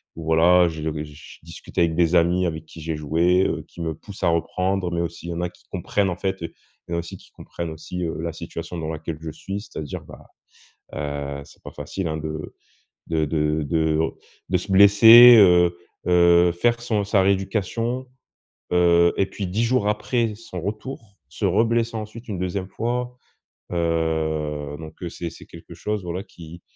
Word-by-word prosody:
où 80 Hz, -, -8 dB
voilà, 85 Hz, +3 st, +5 dB
heu, -, -, +1 dB
je 80 Hz, -1 st, -7 dB, 0.2 s
je 75 Hz, -1 st, -13 dB
discute -, -, -12 dB
avec 85 Hz, -2 st, +2 dB
des 85 Hz, 0 st, +2 dB
amis 90 Hz, +2 st, +3 dB
avec 80 Hz, -1 st, -5 dB
qui 80 Hz, -, -13 dB
j'ai 80 Hz, 0 st, -3 dB
joué, 85 Hz, +5 st, +2 dB
heu, -, -, -3 dB
qui 85 Hz, -, -11 dB
me 80 Hz, -2 st, -3 dB
poussent 100 Hz, +2 st, -11 dB
à 85 Hz, -, +4 dB
reprendre 90 Hz, +2 st, -1 dB
mais 85 Hz, 0 st, -1 dB
aussi 85 Hz, 0 st, -5 dB
il -, -, -5 dB
y -, -, -3 dB
en 85 Hz, -, -4 dB
a 90 Hz, -, -1 dB
qui 90 Hz, -, -24 dB
comprennent, 95 Hz, +2 st, 0 dB
en 85 Hz, -, -4 dB
fait, 95 Hz, -1 st, -3 dB
heu, -, -, -6 dB, 0.3 s
il -, -, -11 dB
y -, -, -1 dB
en -, -, 0 dB
a -, -, 0 dB
aussi 85 Hz, -, -7 dB
qui -, -, -20 dB
comprennent 85 Hz, -1 st, -7 dB
aussi, 80 Hz, +3 st, -6 dB
heu, 80 Hz, -, -4 dB
la 85 Hz, 0 st, -3 dB
situation 85 Hz, +1 st, -7 dB
dans 80 Hz, -2 st, -4 dB
laquelle 80 Hz, 0 st, -5 dB
je 80 Hz, -1 st, -5 dB
suis, 95 Hz, +6 st, -6 dB
c'est-à-dire, 75 Hz, -8 st, -7 dB
bah, -, -, -14 dB, 0.7 s
heu, 70 Hz, -1 st, -4 dB
c'est -, -, -19 dB
pas -, -, -9 dB
facile, 80 Hz, +5 st, -5 dB
hein, 80 Hz, 0 st, -2 dB
de 80 Hz, 0 st, -6 dB, 0.5 s
de 80 Hz, -1 st, 0 dB
de 75 Hz, 0 st, 0 dB
de 80 Hz, 0 st, +1 dB, 0.5 s
de 90 Hz, -, +2 dB
se 95 Hz, +3 st, -6 dB
blesser, 110 Hz, +5 st, +9 dB
heu 90 Hz, -3 st, +6 dB, 0.3 s
heu, 85 Hz, 0 st, +5 dB
faire 120 Hz, +7 st, +1 dB
son 110 Hz, -4 st, 0 dB
sa 100 Hz, 0 st, +2 dB
rééducation, 110 Hz, +6 st, -1 dB, 0.7 s
heu 85 Hz, -1 st, +4 dB
et 95 Hz, -, +2 dB
puis 100 Hz, -, -5 dB
10 100 Hz, +6 st, -1 dB
jours 115 Hz, -3 st, +1 dB
après 110 Hz, +1 st, 0 dB
son 100 Hz, -4 st, -8 dB
retour, 105 Hz, +2 st, -6 dB
se 100 Hz, +6 st, -4 dB
reblesser 115 Hz, +4 st, +1 dB
ensuite 110 Hz, +2 st, -8 dB
une 95 Hz, -, -4 dB
2e 90 Hz, +1 st, -3 dB
fois, 125 Hz, +3 st, -3 dB, 0.6 s
heu, 80 Hz, -3 st, -1 dB
donc 80 Hz, +1 st, -11 dB
heu, 90 Hz, -, -3 dB
c'est 85 Hz, 0 st, -5 dB
c'est -, -, -13 dB
quelque -, -, -13 dB
chose 105 Hz, -3 st, -3 dB
voilà 90 Hz, +2 st, -4 dB
qui 85 Hz, +1 st, -13 dB
85 Hz, 195 wpm, -23 LUFS, 80-100 Hz, 0.7 s, blesser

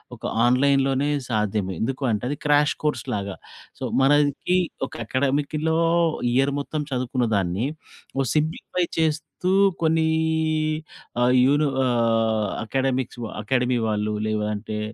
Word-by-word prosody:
ఒక -, -, -21 dB, 0.2 s
ఆన్లైన్‌లోనే 135 Hz, +2 st, +3 dB, 0.2 s
సాధ్యమే. 105 Hz, -4 st, -1 dB
ఎందుకు 135 Hz, +4 st, -2 dB
అంటే 105 Hz, 0 st, -1 dB
అది 145 Hz, -, -3 dB
క్రాష్ 145 Hz, 0 st, +4 dB
కోర్స్‌లాగా. 105 Hz, -8 st, -2 dB, 0.4 s
సో, -, -, -6 dB, 0.2 s
మనకి 145 Hz, +5 st, +3 dB, 0.3 s
ఒక -, -, -16 dB
అకాడెమిక్‌లో 145 Hz, +5 st, 0 dB, 0.6 s
ఇయర్ 135 Hz, +2 st, +2 dB
మొత్తం 150 Hz, +1 st, -3 dB
చదువుకున్న 125 Hz, -1 st, -1 dB
దాన్ని, 95 Hz, +6 st, 0 dB, 0.5 s
ఓ -, -, +3 dB
సింప్లిఫై 160 Hz, +3 st, 0 dB
చేస్తూ 160 Hz, +3 st, -1 dB, 0.3 s
కొన్నీ 160 Hz, 0 st, +2 dB, 1.1 s
ఆహ్, 125 Hz, +1 st, +4 dB
యూని 145 Hz, +2 st, +3 dB, 0.2 s
ఆహ్, 115 Hz, -3 st, +1 dB, 0.2 s
అకాడెమిక్స్ 130 Hz, 0 st, -1 dB
వ -, -, -2 dB, 0.2 s
అకాడమీ 125 Hz, 0 st, +1 dB
వాళ్ళు. 105 Hz, 0 st, -1 dB
లేవంటే 105 Hz, 0 st, -2 dB
130 Hz, 115 wpm, -23 LUFS, 110-145 Hz, 1.1 s, క్రాష్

